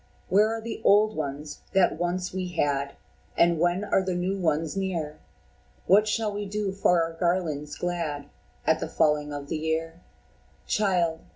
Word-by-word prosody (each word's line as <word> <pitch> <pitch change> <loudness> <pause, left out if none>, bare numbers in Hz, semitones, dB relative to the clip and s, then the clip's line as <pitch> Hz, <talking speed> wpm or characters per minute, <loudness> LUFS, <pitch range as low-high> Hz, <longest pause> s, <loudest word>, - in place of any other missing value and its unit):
Where 210 +3 +4
are - - -7
the 225 0 -6
old 215 +2 +5
ones 145 0 -5
that 190 -4 +3
once 180 +1 -2
we 185 -1 -2
had, 140 -3 0 0.4
And 170 -1 +4
when 175 +3 +2
are 205 -2 +2
the 185 -1 -2
new 180 +2 -1
ones 160 -3 0
near? 165 -6 -3 0.7
What 210 +3 +5
shall 215 0 0
we 205 0 -4
do 205 0 -2
for 180 -3 +3
our 165 0 -4
garlands 165 -4 -1
glad 165 -5 -3 0.4
At 160 0 +3
the 160 - -4
falling 150 -2 +1
of 145 -1 -6
the 160 - -2
year?" 165 +2 -2 0.6
"Child! 180 -6 +1
175 Hz, 165 wpm, -26 LUFS, 155-195 Hz, 0.7 s, old